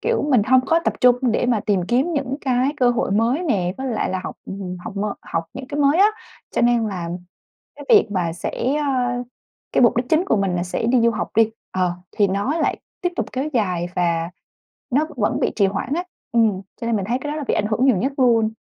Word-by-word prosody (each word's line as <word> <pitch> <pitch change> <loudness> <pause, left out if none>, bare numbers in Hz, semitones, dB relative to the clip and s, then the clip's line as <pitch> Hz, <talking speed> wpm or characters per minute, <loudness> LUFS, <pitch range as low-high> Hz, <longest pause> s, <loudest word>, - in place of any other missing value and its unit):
kiểu, 465 0 0
mình 240 -6 +5
hông 255 +3 +4
có 330 - +4
tập - - +1
trung 245 -1 +6 0.2
để 245 - +1
mà 235 -4 +2
tìm 200 -3 +2
kiếm 265 +8 +2
những 275 -2 -2
cái 255 0 +1
cơ 250 -4 +3
hội 235 - -1
mới 230 - +1
nè, 185 - 0
với 265 - -3
lại 225 -6 -1
là 185 - -2
học - - -6 0.5
học 225 - -6
m 200 - -1 0.2
học 165 - -3
những 265 0 -7
cái 290 0 -2
mới 285 +5 +4
á, 405 - +7 0.4
cho - - -1
nên 240 -2 +3
là 180 -4 -4 0.7
cái - - -10
việc 420 - +5
mà 175 -4 -1
sẽ, 250 - -2
ơ 250 -4 0 0.5
cái - - +2
mục 235 -1 +4
đích 245 - +1
chính 320 +3 +3
của 390 - +2
mình 195 -2 0
là 175 - -1
sẽ 180 - -3
đi 245 +1 +3
du 235 0 +4
học 215 - -3
đi, 225 -1 +5 0.2
ờ, 180 -2 0 0.2
thì 205 -2 +4
nó 200 - -1
lại 325 - 0 0.2
tiếp 355 - +1
tục - - -1
kéo 265 +4 -2
dài 180 -6 0
và 170 -1 0 0.6
nó 295 +4 +1
vẫn 210 - 0
bị - - +1
trì 200 - +3
hoãn 210 +8 -3
á, 350 +3 -1 0.3
ừm, 220 -5 +2 0.2
cho 230 - -2
nên 235 - +1
mình 195 -3 -1
thấy 240 +4 0
cái 295 - -3
đó - - -3
là 295 - -3
bị - - +1
ảnh 210 - +1
hưởng 230 +4 +1
nhiều 250 -8 +4
nhất 265 +9 0
luôn. 230 -4 +3
240 Hz, 245 wpm, -21 LUFS, 200-270 Hz, 0.7 s, á